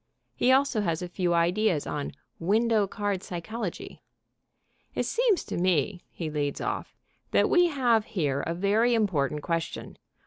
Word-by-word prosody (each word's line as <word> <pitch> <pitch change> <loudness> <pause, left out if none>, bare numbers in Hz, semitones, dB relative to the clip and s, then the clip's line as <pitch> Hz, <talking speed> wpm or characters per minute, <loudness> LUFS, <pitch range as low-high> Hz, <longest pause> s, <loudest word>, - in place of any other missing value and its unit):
He 255 - +2
also 265 -4 +3
has 170 -3 -1
a - - -3
few 175 0 -1
ideas 175 -1 +2
on 145 -1 -4 0.3
Window 215 +3 +2
Card 205 -2 -2
Psychology. 185 +3 -6 0.9
"It - - 0
seems 465 -5 +2
to - - -4
me," 180 0 +1
he 165 - -5
leads 145 -2 -2
off, - - -4 0.3
"that - - +2
we 355 -1 +5
have 245 -8 +2
here 145 -10 -1
a 165 - -3
very 215 +6 +2
important 150 -9 0
question. 165 -1 -3
190 Hz, 145 wpm, -27 LUFS, 165-225 Hz, 0.9 s, we